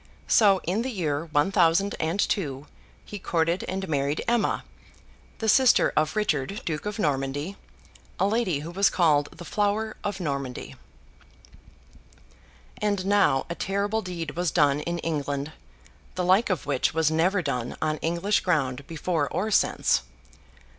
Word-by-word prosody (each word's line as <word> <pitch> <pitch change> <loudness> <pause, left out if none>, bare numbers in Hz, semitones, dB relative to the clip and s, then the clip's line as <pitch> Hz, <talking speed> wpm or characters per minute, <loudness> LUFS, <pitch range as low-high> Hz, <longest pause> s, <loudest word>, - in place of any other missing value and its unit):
So, 200 -4 +5
in 190 +6 0
the 260 - -2
year 165 - -2
one 155 +3 +1
thousand 185 +1 +3
and 165 +5 -1
two, 145 -10 -1 0.4
he 205 - -7
courted 170 0 0
and 190 +1 -3
married 145 -1 -1
Emma, 235 -1 +1 0.7
the 220 - -3
sister 255 +3 +5
of 155 +5 +1
Richard 195 -3 -1
Duke 160 +4 -3
of 210 - -4
Normandy; 145 +1 -1 0.6
a 190 - +3
lady 200 -8 0
who 165 +3 -7
was 195 +3 +3
called 150 -5 +2
the 175 - -11
Flower 210 +3 -1
of 205 -1 -3
Normandy. 140 -6 -4 2.1
And 205 -3 0
now, 195 -10 +3
a 170 - -3
terrible 200 +4 -1
deed 175 -4 -5
was 175 0 -1
done 145 -4 +3
in 170 +3 -3
England, 145 -2 -2 0.6
the 180 - -1
like 190 +6 +4
of 185 - -1
which 145 +1 0
was 160 -1 +2
never 180 +4 +2
done 125 -5 -3
on 155 -1 0
English 170 +6 0
ground 140 -6 -1
before 160 -2 -1
or 215 +3 -2
since. - - +2
170 Hz, 145 wpm, -26 LUFS, 150-200 Hz, 2.1 s, So